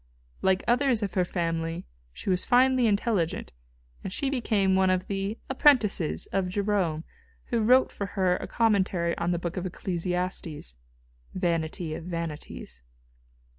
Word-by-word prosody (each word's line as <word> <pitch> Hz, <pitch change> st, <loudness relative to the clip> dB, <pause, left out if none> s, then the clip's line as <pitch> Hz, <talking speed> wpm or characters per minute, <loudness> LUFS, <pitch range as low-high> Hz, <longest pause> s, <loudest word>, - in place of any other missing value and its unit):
Like 190 Hz, 0 st, +2 dB
others 245 Hz, -2 st, +3 dB
of 195 Hz, -, -3 dB
her 185 Hz, -, +2 dB
family 165 Hz, -2 st, -2 dB, 0.3 s
she 70 Hz, -, -3 dB
was 180 Hz, 0 st, +1 dB
finely 255 Hz, 0 st, +4 dB
intelligent, 200 Hz, -, 0 dB, 0.5 s
and 190 Hz, -, -4 dB
she 270 Hz, +7 st, -1 dB
became 210 Hz, -7 st, +1 dB
one 190 Hz, 0 st, +4 dB
of 185 Hz, 0 st, +1 dB
the 200 Hz, +2 st, -3 dB
"apprentices" 250 Hz, -, +3 dB
of 190 Hz, -2 st, 0 dB
Jerome, 190 Hz, -5 st, 0 dB, 0.5 s
who 235 Hz, -, +1 dB
wrote 255 Hz, +4 st, +5 dB
for 200 Hz, -, -4 dB
her 185 Hz, -2 st, +3 dB
a -, -, -6 dB
commentary 190 Hz, -6 st, +1 dB
on 170 Hz, 0 st, 0 dB
the 175 Hz, -, +1 dB
book 170 Hz, +2 st, -4 dB
of 185 Hz, -, -2 dB
Ecclesiastes, 180 Hz, -, -3 dB, 0.6 s
"Vanity 165 Hz, -1 st, -1 dB
of 160 Hz, -, -6 dB
Vanities." 160 Hz, -, -6 dB
185 Hz, 140 wpm, -27 LUFS, 170-210 Hz, 0.6 s, wrote